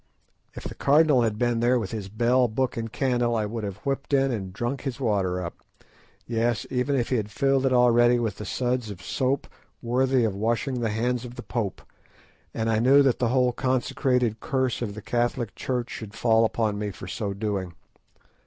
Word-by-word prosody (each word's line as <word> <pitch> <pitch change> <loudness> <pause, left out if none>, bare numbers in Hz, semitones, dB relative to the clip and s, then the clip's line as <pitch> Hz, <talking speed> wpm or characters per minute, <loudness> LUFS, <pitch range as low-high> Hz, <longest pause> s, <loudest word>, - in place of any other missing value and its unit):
If - - -8
the - - -5
Cardinal 145 -2 +4
had 110 -2 0
been 120 0 +1
there 120 +2 +3
with 110 -5 -3
his 105 -4 -5
bell, 120 +4 +2
book, 125 +3 -1
and 115 -1 -4
candle, 120 -2 +1
I 110 -2 0
would 110 +1 -4
have 100 -1 -4
whipped 140 +1 0
in 135 0 +2
and 95 -5 -4
drunk 120 +7 -3
his 135 -2 -4
water 100 -7 0
up; 85 - -8 0.7
yes, 115 -2 0
even 130 +2 0
if 120 -3 0
he 130 - +2
had 105 -2 -2
filled 135 +3 +2
it - - +1
already 120 -1 +5
with 110 -4 -2
the 105 - -6
suds 125 -2 -1
of 95 -2 -9
soap 130 +5 -1 0.3
"worthy 130 +1 +1
of 110 -3 +1
washing 115 +5 -1
the 115 - 0
hands 120 +3 -1
of 125 -1 -9
the - - -8
Pope," 110 -6 -3 0.7
and 110 - -2
I 110 -1 +2
knew 135 +4 +6
that 135 -3 +2
the 125 - +2
whole 125 0 +3
consecrated 125 -2 0
curse 130 -3 -1
of 105 -4 -3
the 105 - -8
Catholic 120 -2 -1
Church 125 -2 -3
should 110 -1 -7
fall 115 -1 +3
upon 110 -2 -1
me 105 0 -2
for 95 -1 -9
so 100 +1 -3
doing. 100 -4 -3
120 Hz, 200 wpm, -25 LUFS, 110-130 Hz, 0.7 s, knew